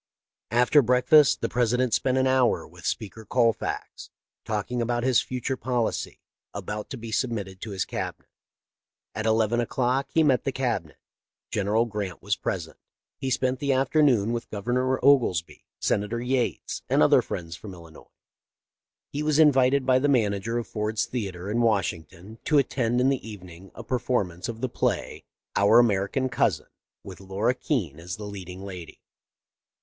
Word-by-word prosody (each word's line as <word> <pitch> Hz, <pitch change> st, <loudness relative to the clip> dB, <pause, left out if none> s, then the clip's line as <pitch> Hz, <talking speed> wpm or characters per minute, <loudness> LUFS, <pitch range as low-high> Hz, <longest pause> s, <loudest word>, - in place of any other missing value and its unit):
After 125 Hz, +6 st, +4 dB
breakfast 125 Hz, +4 st, +4 dB
the -, -, 0 dB
President 125 Hz, 0 st, +1 dB
spent 130 Hz, +4 st, +1 dB
an 130 Hz, -, +3 dB
hour 130 Hz, -2 st, +2 dB
with -, -, -9 dB
Speaker 110 Hz, +1 st, -4 dB
Colfax, 115 Hz, -1 st, -1 dB, 0.4 s
talking 110 Hz, +3 st, -2 dB
about 120 Hz, 0 st, -1 dB
his 130 Hz, -2 st, +4 dB
future 130 Hz, +1 st, -3 dB
policy, 125 Hz, -2 st, -2 dB, 0.4 s
about 105 Hz, 0 st, -5 dB
to 135 Hz, -, -6 dB
be 115 Hz, -1 st, -8 dB
submitted 105 Hz, -6 st, -2 dB
to 115 Hz, -, -6 dB
his 95 Hz, -3 st, -2 dB
Cabinet. -, -, -5 dB, 0.9 s
At 110 Hz, +1 st, -3 dB
eleven 110 Hz, +1 st, +2 dB
o'clock 125 Hz, +2 st, 0 dB
he 160 Hz, -, +3 dB
met 135 Hz, -4 st, +3 dB
the 135 Hz, -, -1 dB
Cabinet. 120 Hz, -13 st, -2 dB, 0.5 s
General 105 Hz, +3 st, +1 dB
Grant 105 Hz, -6 st, -5 dB
was -, -, -1 dB
present. -, -, -4 dB, 0.4 s
He 135 Hz, 0 st, -2 dB
spent 130 Hz, 0 st, 0 dB
the 140 Hz, -1 st, +1 dB
afternoon 130 Hz, -5 st, +3 dB
with 120 Hz, 0 st, -4 dB
Gov 100 Hz, -2 st, -6 dB
ernor 125 Hz, +3 st, +1 dB
Oglesby, 120 Hz, -, +2 dB
Senator 105 Hz, +3 st, 0 dB
Yates, 125 Hz, 0 st, -2 dB
and -, -, +4 dB
other -, -, +5 dB
friends 85 Hz, -1 st, -6 dB
from 95 Hz, +1 st, -10 dB
Illinois. 85 Hz, -2 st, -14 dB, 1.0 s
He 145 Hz, -, -3 dB
was 150 Hz, -1 st, +1 dB
invited 140 Hz, -3 st, +4 dB
by 130 Hz, 0 st, +4 dB
the 145 Hz, +2 st, +1 dB
manager 110 Hz, -3 st, +1 dB
of 120 Hz, -, -2 dB
Ford's 105 Hz, 0 st, -1 dB
theatre, 95 Hz, -7 st, -5 dB
in 120 Hz, +2 st, +1 dB
Washington, 95 Hz, -2 st, -2 dB
to 150 Hz, -, +3 dB
attend 125 Hz, -3 st, +1 dB
in 130 Hz, +2 st, +3 dB
the 130 Hz, -4 st, -2 dB
evening 90 Hz, -2 st, -11 dB
a 115 Hz, -, -8 dB
performance 115 Hz, -6 st, -2 dB
of 115 Hz, 0 st, -6 dB
the 130 Hz, -, 0 dB
play, -, -, -2 dB
' -, -, -61 dB
Our 110 Hz, +4 st, +6 dB
Ameri 100 Hz, -4 st, 0 dB
can 130 Hz, -1 st, 0 dB
Cousin,' 125 Hz, -, 0 dB, 0.4 s
with 95 Hz, -3 st, -10 dB
Laura 100 Hz, +5 st, 0 dB
Keene 105 Hz, -, -2 dB
as 90 Hz, +2 st, -6 dB
the 105 Hz, -, -9 dB
leading 95 Hz, -2 st, -8 dB
lady. 90 Hz, -4 st, -9 dB
115 Hz, 165 wpm, -26 LUFS, 100-130 Hz, 1.0 s, Our